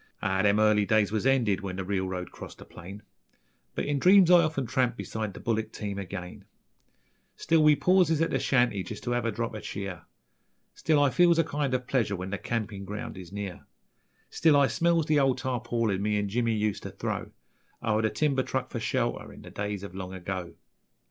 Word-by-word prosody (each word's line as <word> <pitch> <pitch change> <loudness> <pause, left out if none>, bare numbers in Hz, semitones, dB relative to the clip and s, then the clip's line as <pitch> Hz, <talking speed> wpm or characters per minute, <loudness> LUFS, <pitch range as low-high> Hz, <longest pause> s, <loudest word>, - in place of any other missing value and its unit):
Ah, 95 0 0
them 105 +1 +3
early 105 -1 +4
days 105 -1 +2
was 110 +4 0
ended 120 -8 +2
when 95 -2 -5
the 95 - -3
reelroad 95 -2 -3
crossed - - -10
the - - -12
plain, 95 +4 -11 0.7
But - - -2
in 145 -1 0
dreams 185 +2 +6
I 175 -1 +8
often 155 -5 -1
tramp 125 +1 0
beside 110 -3 -4
the - - -8
bullick 110 -2 -2
team 100 -3 -5
again: 90 -1 -7 0.9
Still 165 0 +2
we 150 -1 +6
pauses 180 -2 +3
at 165 - +1
the - - +1
shanty 120 -6 +2
just 105 +4 -8
to 120 - -2
have 120 -1 0
a 115 - +1
drop 115 +2 -3
er 105 - -6
cheer, 95 -4 -6 0.7
Still 155 -2 +1
I 140 - +3
feels 175 +1 +4
a 165 - +4
kind 145 -3 -1
ov 125 0 -3
pleasure 115 -6 0
when 95 +1 -6
the 100 - -3
campin' 105 -3 -3
ground 105 +2 -6
is 90 -2 -10
near; 100 -3 -6 0.6
Still 155 -3 +4
I 140 - +5
smells 170 +2 +1
the 150 -1 +3
old 135 -2 +2
tarpaulin 120 -5 -1
me 105 0 +1
an' 100 -1 -1
Jimmy 115 +1 0
useter 105 -1 -2
throw - - -4 0.5
O'er 110 -1 +1
the 110 - +1
timber 140 +1 +1
truck - - -3
for - - -3
shelter - - -2
in - - -13
the - - -11
days 100 -1 -4
ov 100 - -8
long 95 0 -6
ago. 95 -1 -5
110 Hz, 205 wpm, -28 LUFS, 100-135 Hz, 0.9 s, I